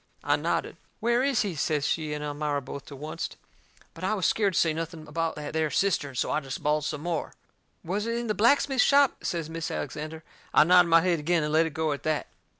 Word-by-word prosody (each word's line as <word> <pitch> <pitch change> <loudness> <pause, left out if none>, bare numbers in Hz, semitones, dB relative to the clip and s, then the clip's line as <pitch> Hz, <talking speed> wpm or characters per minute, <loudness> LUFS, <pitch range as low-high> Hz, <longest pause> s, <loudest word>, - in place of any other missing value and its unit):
I - - +3
nodded. - - -2 0.2
"Where 235 +2 +2
is 270 -4 +2
he?" 200 -3 -2
says 150 -1 0
she 155 -2 -1
and 150 0 -3
Elmira, 145 0 -2
both 140 0 -8
to 140 - -9
oncet. 160 +2 -5 0.6
But 165 - -11
I 195 +3 +1
was 190 - -1
scared 200 -4 +2
to - - +4
say 160 -2 +3
nothing 165 -1 -6
about 165 +2 -2
that 150 0 -6
there 160 -1 +1
cistern, 150 -9 0
so - - 0
I - - +1
jest 135 -3 -7
bawled 150 0 +1
some 150 -2 -3
more. 170 -1 -3 0.5
"Was 205 +6 -2
it 230 - -1
in 240 - -3
the 215 - 0
blacksmith 265 +4 +3
shop?" 280 -1 +4
says 165 -3 -2
Mis' 165 0 -4
Alexander. 155 +3 -5 0.3
I - - +8
nodded 180 +1 +5
my 165 0 +6
head 175 -2 +1
agin 165 +2 +1
and 150 0 -2
let 160 +1 +4
it 160 - -9
go 160 -2 0
at 140 - -3
that. 155 -1 -1
160 Hz, 235 wpm, -27 LUFS, 150-185 Hz, 0.6 s, I